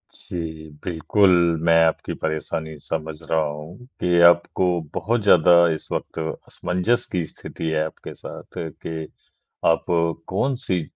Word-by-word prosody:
जी, 80 -2 -6
बिल्कुल 95 +3 +3 0.3
मैं 85 -1 +5
आपकी 80 - -1
परेशानी 80 0 -3
समझ 80 0 -4 0.2
रहा 80 - +4
हूँ 75 +9 -6
कि 90 -1 +2
आपको 85 +2 +3 0.3
बहुत 110 +6 0
ज़्यादा 90 -3 +6 0.2
इस 80 - -7
वक़्त - - -4 0.3
असमंजस 110 +7 0
की 90 -4 0
स्थिति 80 - -7
है 80 -1 +1
आपके 80 - -8
साथ - - -10 0.3
कि 80 -1 -4 0.6
आप 80 - +3 0.4
कौन-सी 100 -4 0
85 Hz, 125 wpm, -23 LUFS, 80-90 Hz, 0.6 s, ज़्यादा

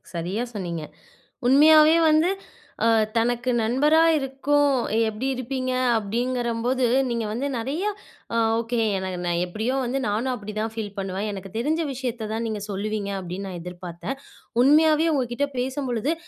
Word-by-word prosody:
சரியா 180 +7 -2
சொன்னீங்க. 170 -5 -4 0.6
உண்மையாவே 305 +4 +7
வந்து 310 +3 +4 0.6
அ - - +5 0.3
தனக்கு 240 +2 +1
நண்பரா 290 +8 +3 0.2
இருக்கும் 285 +1 +1 0.4
"எப்படி 220 +5 -4
இருப்பீங்க?" 255 +1 -3 0.3
அப்படீங்கிறம்போது, 240 +3 -1 0.2
நீங்க 235 -2 -1
வந்து 245 +6 -2
நெறையா 280 - -2 0.5
அ - - +2 0.2
ஓகே. 235 +1 -2 0.2
எனக்கு 185 -1 -4
நான் 175 0 0
எப்படியோ 220 +8 -2
வந்து, 255 +2 -1
நானும் 225 +5 0
அப்படிதான் 215 -1 -4
ஃபீல் 220 -3 -4
பண்ணுவேன். 195 +1 -3
"எனக்கு 195 -1 -7
தெரிஞ்ச 305 +8 0
விஷயத்த 240 -4 -4
தான் 225 +1 -2
நீங்க 215 -2 -3
சொல்லுவீங்க." 205 0 -3
அப்படீன்னு 185 +2 -6
நான் 175 - -6
எதிர்பாத்தேன். 180 +7 -6 0.4
உண்மையாவே 310 +3 +5
உங்க 270 -3 +2
கிட்ட 285 +4 0
பேசம்பொழுது, 260 +1 -1
235 Hz, 135 wpm, -24 LUFS, 205-270 Hz, 0.6 s, உண்மையாவே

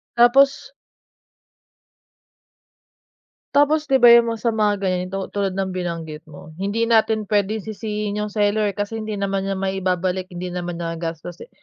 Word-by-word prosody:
Tapos 275 - +4 2.8
Tapos, 300 +1 +3
'di 270 - +2
ba 240 -2 +7
yung 235 0 +7
mga 220 - -14
sa 235 - +2
mga 210 -2 +1
ganito 185 0 -1
tulad 195 -2 -2
ng 190 -1 -2
binanggit 165 -4 -5
mo, 155 +1 -12
hindi 205 +4 -1
natin 220 -1 +2
puwedeng 205 0 0
sisihin 210 -1 -4
yung 210 - -2
seller 205 -1 +1
kasi 205 +2 -3
hindi 215 -1 -4
naman 195 -1 -2
niya 195 - -1
maibabalik, 185 -1 -1
hindi 180 -1 -6
naman 175 -1 -4
niya 165 -1 -4
gastos, 165 +1 -6
eh. - - -11
200 Hz, 150 wpm, -21 LUFS, 180-220 Hz, 2.8 s, ba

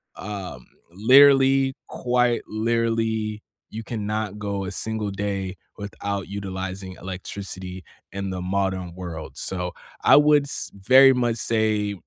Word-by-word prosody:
Um, 95 -11 -7 0.3
literally, 135 +5 +6
quite 125 -1 +1
literally, 110 -1 -1 0.3
you 110 +1 -7
cannot 105 -2 -3
go 100 -1 -3
a 95 - -4
single 110 +1 -3
day 100 -1 -3 0.2
without 100 -1 -4
utilizing 95 -1 -5
electricity 95 0 -7 0.3
in 100 0 -3
the 90 -1 -4
modern 95 -2 -2
world, 85 -4 -7
so 90 -2 -3 0.3
I - - +7
would 150 -1 +5
s 140 - -4
very 130 +7 +6
much 120 -2 0
say, 110 -2 0
105 Hz, 120 wpm, -24 LUFS, 95-115 Hz, 0.3 s, I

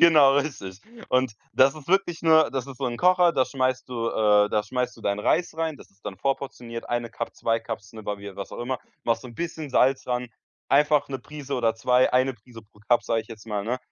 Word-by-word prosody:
genau, 150 -5 +7
richtig. 115 -10 -3 0.3
Und 130 -2 +2 0.2
das 135 +1 +5
ist 155 -1 -12
wirklich 185 -2 +1
nur 160 -1 +5
das 135 -2 -2
ist 135 - -9
so 135 - -3
'n 120 -2 -2
Kocher, 180 -1 +4
da 135 -4 +3
schmeißt 130 -1 -1
du, 115 -2 -2
äh 105 -2 +4
da 105 0 +1
schmeißt 125 +3 -3
du - - -15
deinen 100 -1 -1
Reis 160 +8 +1
rein, 160 -2 -2
das - - -16
ist 100 +1 -34
dann 95 - -5
vor-portioniert, 120 -1 -4
1 120 -1 -1
Cup, 115 - -5
2 115 0 0
Cups, 100 -2 -7
ne, 110 -1 -9
wa 105 0 -3
wie 100 -1 -9
was 100 - -7
auch - - -7
immer. 125 +1 -2 0.3
Machst 115 -1 +1
so 125 - -9
'n 120 - -13
bisschen 160 -1 -5
Salz 130 +1 +3
daran, 125 -1 -2 0.4
einfach 145 0 +3
'ne 135 -1 -4
Prise 145 -1 -7
oder 115 -3 +1
2, 125 +3 +3
1 130 +1 +3
Prise 115 0 -14
pro 105 0 -24
Cup, 120 - +4
sage 115 -1 0
ich 110 - -24
jetzt 115 -1 -11
mal, 105 -2 -3
ne? 125 +4 -1
125 Hz, 240 wpm, -25 LUFS, 115-140 Hz, 0.4 s, genau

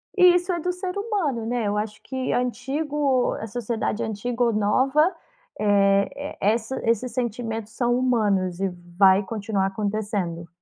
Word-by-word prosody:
E 360 -2 +7
isso 355 +1 0
é 345 - -1
do 360 +2 -1
ser 360 +1 -5
humano, 375 - -1
né. 235 -2 -1
Eu 205 0 0
acho 210 0 -4
que 260 -1 -3
antigo 270 +2 0
a 220 - -5
sociedade 225 0 -2
antiga 235 +3 -2
ou 235 -1 +2
nova, 265 - +3 0.5
eh, 200 +7 +2
essa 225 +5 0
esses 235 +2 +1
sentimentos 225 -2 -3
são 240 -1 +1
humanos 205 -8 +1
e 195 0 0 0.3
vai 195 0 +6
continuar 200 -1 -1
acontecendo. 200 -4 -3
230 Hz, 145 wpm, -24 LUFS, 205-265 Hz, 0.5 s, E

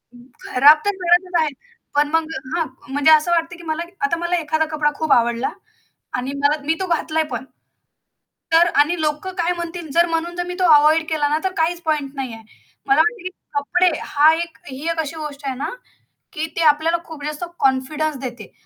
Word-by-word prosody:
खराब 265 +4 +4
तर 410 - +3
करायचंच 350 0 +3
आहे. 310 - +1 0.5
पण 295 0 +3
मग 325 0 +2 0.3
हां. 330 -2 +1 0.3
म्हणजे 290 +2 +4
असं 310 +3 +5
वाटतं 335 +1 0
की 340 - -13
मला 320 +1 -2 0.2
आता 335 -5 0
मला 345 +1 -1
एखादा 315 0 0
कपडा 300 -1 +1
खूप 315 0 -2
आवडला 235 +1 +2 0.7
आणि 255 +2 -3
मला 295 +1 +2
मी 320 - +2
तो 375 - -2
घातलाय 320 -1 0
पण 245 +2 -4 1.1
तर 340 +1 +6
आणि 330 +3 +2
लोक 300 +3 -1
काय 345 +1 +1
म्हणतील 340 -1 -6
जर 340 +1 +4
म्हणून 335 +1 -2
जर 355 - -2
मी 360 - -5
तो - - +3
अव्हॉइड 310 +2 +4
केला 300 -2 +1
ना, 305 +1 +1
तर 380 - 0
काहीच 340 +2 +1
पॉइंट 300 -4 -1
नाहीये. 245 -5 -6 0.4
मला 405 -4 +4
वाटतं, 435 +2 +1
की 370 - -3 0.3
कपडे 355 +6 +2 0.2
हा 300 +2 +5
एक 335 0 -5
ही 280 +5 -5
एक 330 - -3
अशी 315 +1 -5
गोष्ट 295 -2 -7
आहे 265 - -2
ना, 275 - -3 0.7
की 310 +1 -2
ते 335 - -1
आपल्याला 320 +3 +2
खूप 310 -3 -10
जास्त 300 +3 -4 0.2
कॉन्फिडन्स 280 +3 0
देते. 240 -5 -7
315 Hz, 195 wpm, -20 LUFS, 290-340 Hz, 1.1 s, तर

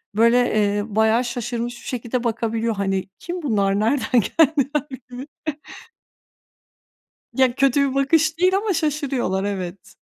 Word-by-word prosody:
böyle, 230 +3 +5 0.2
eee, 205 -1 +1
bayağı 220 +2 +3
şaşırmış 240 0 -4
bir - - -12
şekilde 245 0 -3
bakabiliyor. 230 -1 -1
Hani 195 -1 -2
kim 355 +1 -5
bunlar? 200 -8 +1
Nereden 245 +1 +2
geldiler? 295 +2 +1 0.2
Gibi. 250 +3 -8 2.1
Ya 260 -2 +2
kötü 275 +1 +3
bir 265 - -6
bakış 315 +3 +2
değil 370 +2 +4
ama 410 0 0
şaşırıyorlar. 280 - -1
Evet. 190 -1 -5
245 Hz, 125 wpm, -22 LUFS, 215-280 Hz, 2.1 s, böyle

